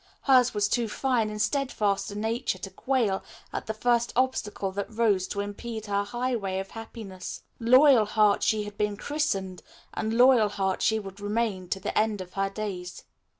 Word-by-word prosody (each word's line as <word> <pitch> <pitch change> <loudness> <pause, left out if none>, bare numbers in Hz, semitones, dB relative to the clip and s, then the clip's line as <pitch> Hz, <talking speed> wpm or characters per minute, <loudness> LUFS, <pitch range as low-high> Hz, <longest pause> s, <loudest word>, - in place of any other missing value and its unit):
Hers 255 -4 +4
was 205 -1 +2
too 235 +2 0
fine 235 -1 0
and 210 0 -6
steadfast 220 -5 0
a 205 - -7
nature 225 0 -1
to 190 +1 -7
quail 225 -2 0 0.3
at - - -4
the 220 - -1
first 235 +1 +1
obstacle 225 -6 0
that 200 +3 -4
rose 215 -5 +2
to 200 - -3
impede 220 +2 -6
her 200 -1 0
highway 235 -4 -2
of 195 0 -5
happiness. 220 -5 -8 0.2
"Loyalheart" 230 -5 +5
she 215 -1 +1
had 205 0 -9
been 210 -1 0
christened 200 - -2 0.3
and 220 0 -2
"Loyalheart" 215 -7 +4
she 220 - +3
would 195 -2 -8
remain 205 -3 -1
to 195 - -1
the 205 - -4
end 215 -1 +1
of 185 -1 -8
her 195 0 0
days. 195 -3 -6
210 Hz, 170 wpm, -27 LUFS, 195-235 Hz, 0.3 s, Loyalheart